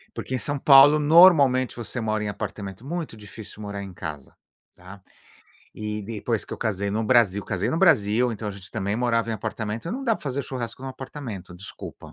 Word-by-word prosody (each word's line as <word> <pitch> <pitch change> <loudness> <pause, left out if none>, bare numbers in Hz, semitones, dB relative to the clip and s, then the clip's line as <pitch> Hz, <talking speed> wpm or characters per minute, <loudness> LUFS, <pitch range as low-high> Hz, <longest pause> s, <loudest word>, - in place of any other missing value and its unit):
Porque 130 - -4
em - - 0
São 145 +2 -3
Paulo 145 +2 +7
normalmente, 145 -5 +6
você 120 +1 -4
mora 110 -1 -1
em 105 - -2
apartamento 100 +1 -6
muito 165 -4 -5
difícil 105 0 -11
morar 100 -1 -5
em 95 -2 -9
casa, 75 -5 -8 0.4
tá. 95 +2 -13 0.7
E, 105 0 -4
depois 110 +1 -3
que - - -10
eu - - -6
casei 100 -3 -2
no 110 +3 -1
Brasil, 105 -5 +3
casei 95 -3 -2
no 160 - -1
Brasil, 125 - +3
então 110 -1 -6
a - - -2
gente 100 +1 -11
também 100 -1 -2
morava 115 -1 0
em - - -1
apartamento, 110 - -4
não 265 +5 -4
dá 230 -3 +2
pra 175 - -11
fazer 140 -2 -2
churrasco 125 -2 -5
no 135 - -5
apartamento, 125 -9 -8
desculpa! 95 +2 -10
115 Hz, 200 wpm, -24 LUFS, 100-135 Hz, 0.7 s, Paulo